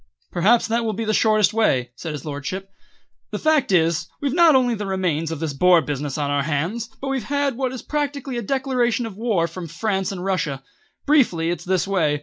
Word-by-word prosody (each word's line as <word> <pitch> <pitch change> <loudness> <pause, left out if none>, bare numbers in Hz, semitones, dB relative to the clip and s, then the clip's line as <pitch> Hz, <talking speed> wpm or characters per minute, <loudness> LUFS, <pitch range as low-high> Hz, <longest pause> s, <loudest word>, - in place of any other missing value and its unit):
"Perhaps 210 +7 +3
that 230 +1 +1
will 220 -1 -1
be 225 +3 -3
the 215 - 0
shortest 215 -1 +3
way," 130 - +1
said 160 +2 -6
his 145 -1 -7
lordship. 170 +7 -5 0.6
"The - - -4
fact 310 -7 +2
is, 165 -3 +2
we've 280 -2 -1
not 335 -3 +6
only 250 -2 +3
the 205 -2 -4
remains 175 -5 -1
of 160 - -4
this 160 -2 -2
Boer 180 +4 +5
business 145 -2 -3
on 145 -1 -1
our 145 0 +1
hands, 165 +11 -2
but 275 - -4
we've 265 -5 -2
had 285 +1 0
what 260 0 -1
is 260 - -7
practically 280 -3 -3
a - - -3
declaration 250 -1 0
of 220 -4 -7
war 210 -6 0
from 170 +1 -7
France 190 +3 -2
and 185 -1 -5
Russia. 150 -8 -1 0.4
Briefly 205 - +3
it's 175 - -5
this 185 0 +1
way. 160 -7 +1
195 Hz, 210 wpm, -22 LUFS, 165-245 Hz, 0.6 s, not